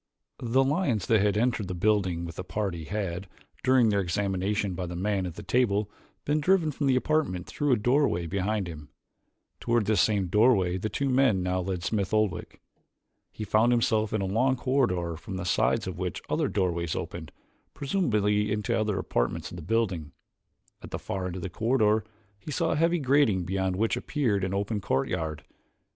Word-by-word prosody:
The 125 +3 +2
lions 135 - 0
that 110 -4 +3
had 105 0 +2
entered 115 -3 0
the 90 - -4
building 95 -3 +1
with 85 -2 -8
the - - -4
party 95 -5 -3
had, 95 -2 -3 0.4
during 130 -3 +4
their 100 -1 +2
examination 100 +1 -1
by 90 0 -4
the 85 - -6
man 95 0 -1
at 85 - -7
the 105 - -8
table, 105 -1 +1 0.3
been 150 +1 +1
driven 170 -1 +3
from 145 0 -2
the 130 - +4
apartment 130 - 0
through 145 -1 -1
a - - +6
doorway 120 - +2
behind 100 +3 -1
him. 75 -3 -9 0.7
Toward 115 -2 +1
this 110 +1 +3
same 100 -3 +2
doorway 95 -2 +3
two 110 +8 -2
of - - +1
the - - +1
men 125 -9 +3
now 90 0 0
led 90 -1 -3
Smith 100 +1 -1
Oldwick. 105 -5 -1 0.7
He 110 - -6
found 110 +3 +3
himself 110 -3 +2
in 110 - 0
a - - -1
long 125 +7 +2
corridor 100 - 0
from 95 +4 -7
the 85 - -4
sides 95 - +1
of 90 -2 -6
which 90 -4 -3
other - - 0
doorways 85 -4 -1
opened, - - -6 0.4
presumably 105 - +1
into 105 -1 -1
other 105 -2 0
apartments 80 -1 -2
of - - -8
the - - -7
building. 90 -5 -1 0.7
At - - -9
the - - -4
far 95 -1 -4
end 90 - -5
of 95 - -6
the 95 - -3
corridor 110 0 +2 0.4
he 105 - -10
saw 165 +2 0
a - - +1
heavy 165 +3 +2
grating 135 - +3
beyond 95 0 -1
which 110 +4 +1
appeared 115 -10 -1
an 95 - -1
open 100 +2 -2
courtyard. 80 +1 -2
105 Hz, 190 wpm, -27 LUFS, 90-120 Hz, 0.7 s, a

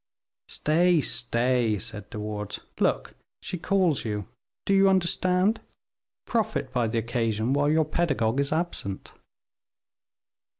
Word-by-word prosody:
"Stay, 170 +2 +2
stay," 120 -3 +1
said 105 -1 -7
De 105 - -6
Wardes; 105 -1 -4 0.2
"look, - - 0 0.3
she 180 - -4
calls 185 -5 +1
you, 105 -4 -3 0.4
do 200 - +2
you 195 0 +5
understand? 185 +3 +2 0.6
Profit 145 - -1
by 120 -3 +1
the 115 +1 -2
occasion, 115 +1 0
while 145 +1 +2
your 155 +1 +3
pedagogue 140 -7 0
is 140 0 0
absent." 155 - -3
135 Hz, 120 wpm, -26 LUFS, 115-175 Hz, 0.6 s, you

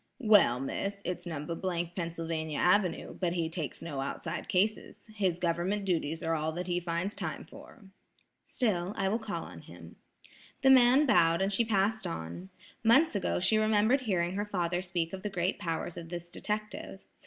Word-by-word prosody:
"Well, 210 - +5
Miss, 195 +9 -3
it's 180 0 -4
No. 155 -3 -4 0.4
— 175 +1 -18
Pennsylvania 165 -3 -3
Avenue; 180 0 +2
but 175 -2 -1
he 165 -2 -1
takes 160 -4 -4
no 145 -5 -4
outside 160 +4 -4
cases. 210 +5 -1
His 190 -5 0
government 180 +4 -1
duties 165 -3 -1
are 165 - 0
all 155 0 -1
that 180 +2 -4
he 175 0 0
finds 175 +3 -3
time - - -4
for." 225 - -14 0.6
"Still, 200 -6 -1
I 195 - +1
will 215 +4 +1
call 220 -2 -4
on - - -10
him." - - -13 0.7
The 265 - +7
man 260 +3 +6
bowed, 165 - +4
and 195 +1 0
she 235 - +3
passed 220 0 +1
on. 85 +3 -6 0.3
Months 255 +6 +5
ago 200 - 0
she 215 +4 +3
remembered 215 +5 +3
hearing 180 -7 0
her 205 +2 -2
father 175 -3 -1
speak 175 -2 -2
of 190 - -5
the 210 - -3
great 185 -1 -1
powers 165 0 -3
of 165 -1 -7
this 175 0 -7
detective. 210 -2 -4
180 Hz, 175 wpm, -30 LUFS, 165-210 Hz, 0.7 s, The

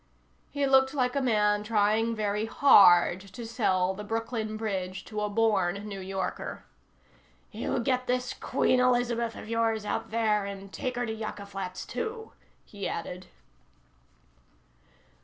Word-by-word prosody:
He 285 -1 -1
looked 265 0 +4
like 250 -2 0
a 280 - +1
man 210 -4 +2
trying 220 +1 +1
very 210 0 -1
hard 185 -9 +6
to 200 +4 -10
sell 190 -5 +1
the 210 +2 -7
Brooklyn 225 0 -3
Bridge 190 -4 -4
to 210 -1 -4
a 210 - -1
born 205 -2 +1
New 200 -2 -6
Yorker. 190 0 -4 0.9
"You - - -2
get 255 +1 0
this 250 0 -1
Queen 255 - +1
Elizabeth 240 -2 +1
of - - -9
yours 225 -1 0
out - - -2
of - - -20
there 215 -2 +1
and 195 0 -8
take 255 - -3
her 245 0 -1
to 220 - -3
Yucca 215 -2 -6
Flats, 190 -2 -6
too," 450 -1 -5 0.3
he 200 -2 -6
added. 180 +2 -6
215 Hz, 145 wpm, -28 LUFS, 200-240 Hz, 0.9 s, hard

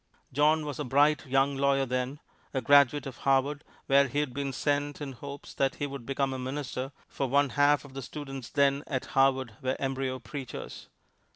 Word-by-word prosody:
John 150 +3 +3
was 145 -2 -5
a - - -1
bright 145 +3 +3
young 135 +2 +2
lawyer 135 0 +2
then, 125 +3 -2 0.4
a 130 - +1
graduate 140 +2 +5
of 130 -3 -7
Harvard, 135 +2 +1 0.2
where 140 +1 +5
he 140 - -5
had 145 -4 0
been 140 0 -2
sent 145 +1 -1
in 145 -2 -5
hopes 140 +2 -9
that 135 -1 0
he 145 - -2
would 140 -4 -7
become 135 -1 0
a 130 - -4
minister, 130 0 -4 0.2
for 135 - -2
one 140 +1 +3
half 145 +3 +3
the 135 -1 -8
students 135 -2 -7
then 140 0 +2
at 130 -4 -2
Harvard 130 -4 +2
were 130 0 0
embryo 135 -1 -2
preachers. 130 +1 -8
135 Hz, 185 wpm, -29 LUFS, 130-145 Hz, 0.4 s, graduate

